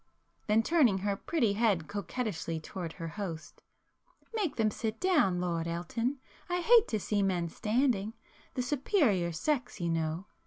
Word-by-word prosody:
—then 220 +1 +4
turning 270 - +4
her 200 +1 -1
pretty 230 -2 0
head 200 -7 +1
coquettishly 205 -5 -3
towards 165 +1 -6
her 165 - -5
host—"Make 205 - -7
them 220 -2 +2
sit 220 +1 -3
down, 295 - +3
Lord 170 -2 -1
Elton,—I 245 - -3
hate 460 +4 +6
to 215 - -1
see 205 +1 0
men 180 -3 0
standing. 220 - 0 0.4
The 250 - 0
superior 250 - +2
sex, 245 - -1
you 170 -1 -1
know! 165 +2 -1
210 Hz, 140 wpm, -31 LUFS, 175-255 Hz, 0.4 s, hate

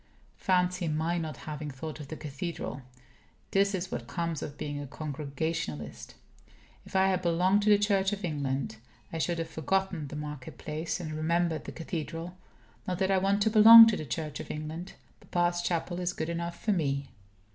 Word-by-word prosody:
Fancy 180 -1 +1
my 160 +3 0
not 155 -4 -4
having 150 -1 -6
thought 150 +3 -7
of 145 - -8
the 155 - -6
cathedral! 145 -3 -5 0.7
This 200 0 +3
is 185 0 -4
what - - -4
comes 170 -3 -2
of 145 - -6
being 145 -1 -4
a 145 - -6
Congregationalist. 140 - -4 0.7
If - - -12
I 190 0 +4
had 185 -1 +1
belonged 180 +4 +3
to 210 - +2
the 205 - +7
Church 200 -1 +2
of 205 -1 -3
England, 140 -7 -2 0.4
I 165 - -2
should 170 +1 0
have 165 0 -2
forgotten 180 0 -1
the 145 - -8
market 150 -3 -7
place, 155 +4 -3
and 155 -3 -5
remembered 165 +1 0
the - - -6
cathedral. 165 +1 -5 0.5
Not 180 -1 -1
that 190 +1 +1
I 190 - +4
want 200 +2 +2
to 220 - +2
belong 225 +1 +11
to 215 - +1
the - - -4
Church 150 +2 -4
of - - -7
England. 155 +4 -5 0.4
Papa's 175 0 +1
chapel 175 0 -1
is 180 0 -1
good 160 - -3
enough 170 0 -4
for 215 - 0
me. 140 -7 -1
165 Hz, 185 wpm, -29 LUFS, 150-185 Hz, 0.7 s, belong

